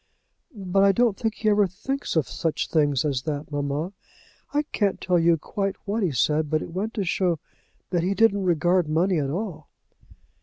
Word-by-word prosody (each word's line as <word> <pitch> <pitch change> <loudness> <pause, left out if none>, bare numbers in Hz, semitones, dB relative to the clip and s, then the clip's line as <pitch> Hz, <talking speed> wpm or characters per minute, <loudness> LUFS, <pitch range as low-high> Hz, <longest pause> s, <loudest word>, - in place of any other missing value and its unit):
"But 195 -1 +1
I 200 0 +5
don't 235 -1 +2
think 220 +1 -2
he 215 - 0
ever 205 -1 +4
thinks 270 +10 -4
of 160 -4 +2
such 165 -2 -2
things 145 -4 +2
as 135 -4 0
that, 150 0 -4
mamma. 145 +5 -2 0.6
I 295 +1 +1
can't 200 -3 0
tell 180 -2 +2
you 165 0 +4
quite 195 +5 -3
what 210 +3 -1
he 185 - +2
said, 150 +4 +1
but 155 0 0
it 165 - -9
went 210 +5 -3
to 205 - 0
show 175 -1 +1 0.5
that 175 -2 +1
he 190 +3 0
didn't 205 -3 +3
regard 175 0 +2
money 170 +3 +2
at 140 -2 -1
all." 170 -2 -5
180 Hz, 190 wpm, -25 LUFS, 155-200 Hz, 0.6 s, I